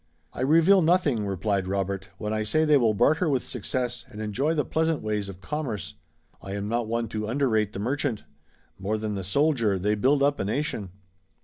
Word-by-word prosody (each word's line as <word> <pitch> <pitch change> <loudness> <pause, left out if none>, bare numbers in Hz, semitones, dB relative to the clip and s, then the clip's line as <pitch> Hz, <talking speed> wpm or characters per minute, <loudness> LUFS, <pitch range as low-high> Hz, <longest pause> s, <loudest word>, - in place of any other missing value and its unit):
"I - - -5
reveal 165 +8 +5
nothing," 155 - +2
replied 95 0 -1
Robert, 95 0 -2
"when 105 0 -3
I 110 - 0
say 155 +9 +1
they 150 - +3
still 115 -7 +4
barter 155 - +3
with 135 -4 +1
success 125 +1 -3
and 105 - -10
enjoy 125 +10 0
the 150 - 0
pleasant 160 -3 0
ways 105 -2 -2
of 95 -1 -10
commerce. 130 -7 -4 0.5
I 95 - -6
am 100 0 -3
not 115 +1 -1
one 115 +1 -1
to 105 -1 -3
underrate 110 -5 +1
the - - -5
merchant. 125 +2 -1 0.6
More 100 +3 -1
than 105 -1 -3
the 95 -1 -3
soldier 115 - +2
they 105 +3 +1
build 135 +7 +2
up 145 0 +2
a - - 0
nation." 110 -3 -2
110 Hz, 195 wpm, -26 LUFS, 105-145 Hz, 0.6 s, reveal